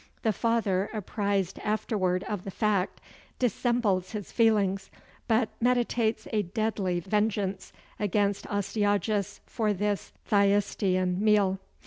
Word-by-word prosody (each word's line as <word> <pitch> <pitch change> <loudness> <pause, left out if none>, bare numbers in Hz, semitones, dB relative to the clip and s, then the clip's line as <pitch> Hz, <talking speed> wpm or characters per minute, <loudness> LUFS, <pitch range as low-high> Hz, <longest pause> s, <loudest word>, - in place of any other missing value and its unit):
The 220 -3 +2
father, 210 -4 +1
apprised 200 -2 -1
afterward 200 -4 0
of 205 -4 -4
the - - -6
fact, 200 -2 0 0.4
dissembles 235 -6 +1
his 210 -3 -5
feelings, 200 -4 +2 0.4
but 225 -1 +2
meditates 235 -2 +1
a 215 - +3
deadly 200 -2 -1
vengeance 200 0 -1 0.3
against 205 0 0
Astyages 205 0 0
for 215 -3 0
this 205 +1 -2
Thyestean 195 -3 +2
meal. 205 -3 +3
205 Hz, 105 wpm, -28 LUFS, 195-220 Hz, 0.4 s, a